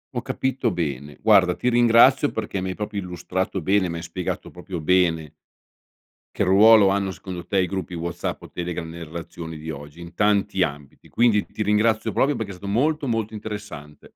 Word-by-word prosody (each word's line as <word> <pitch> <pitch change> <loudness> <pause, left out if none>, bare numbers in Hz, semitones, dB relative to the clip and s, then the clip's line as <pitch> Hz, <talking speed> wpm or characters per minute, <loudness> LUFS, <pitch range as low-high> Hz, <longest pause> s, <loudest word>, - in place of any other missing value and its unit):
Ho - - -1
capito 130 -2 -1
bene. 75 - -4
Guarda 95 -5 +4
ti 125 - 0
ringrazio 120 +4 +5
perché 100 -3 -4
mi 95 - -3
hai 95 - -4
proprio 105 -1 -4
illustrato 95 +1 -3
bene, 95 +2 +2
mi 85 - -4
hai 85 - -7
spiegato 85 +1 -5
proprio 90 0 -7
bene 80 -2 +1 1.0
che - - +1
ruolo 105 +2 +7
hanno 100 0 0
secondo 90 -2 -8
te 100 - 0
i 90 - 0
gruppi 95 -2 -5
WhatsApp 85 0 -4
o - - -12
Telegram 85 -1 -5
nelle 85 +1 -8
relazioni 80 0 -8
di 80 +1 -8
oggi, 75 +2 -8
in 85 0 -11
tanti 100 -2 +2
ambiti. 70 -2 -7
Quindi 115 -3 +2
ti - - -8
ringrazio 105 +1 +2
proprio 140 +2 +1
perché 100 -3 -4
è - - -11
stato 100 +2 -6
molto, 150 +7 +1
molto 110 -3 -2
interessante. 100 -9 -9
95 Hz, 185 wpm, -23 LUFS, 85-110 Hz, 1.0 s, ruolo